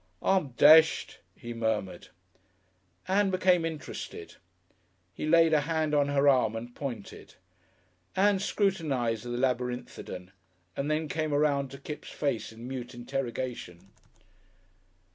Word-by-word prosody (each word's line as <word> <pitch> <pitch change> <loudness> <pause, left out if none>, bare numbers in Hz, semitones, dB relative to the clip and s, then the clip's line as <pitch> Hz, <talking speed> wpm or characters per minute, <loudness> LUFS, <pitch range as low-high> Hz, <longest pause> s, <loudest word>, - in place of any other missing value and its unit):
"I'm 185 -9 +1
deshed," 155 +5 +6 0.2
he 120 0 -8
murmured. 110 -6 -2 1.0
Ann 195 +1 +2
became 185 -2 +3
interested. 160 -2 -6 0.8
He 150 - -4
laid 165 0 +5
a 150 - +4
hand 155 0 -1
on 145 -1 +3
her 145 0 +2
arm 125 -5 +4
and 120 +2 -7
pointed. 120 -8 -7 0.8
Ann 195 +1 +3
scrutinised 145 - 0
the - - -6
Labyrinthodon 125 -7 -3 0.4
and 140 +2 -2
then 155 +1 0
came 155 0 -1
around 145 -2 +1
to 135 - -10
Kipps' 150 +2 -8
face 120 -6 -2
in 115 +2 -10
mute 125 -2 -6
interrogation. 120 -7 -5
140 Hz, 120 wpm, -29 LUFS, 120-160 Hz, 1.0 s, deshed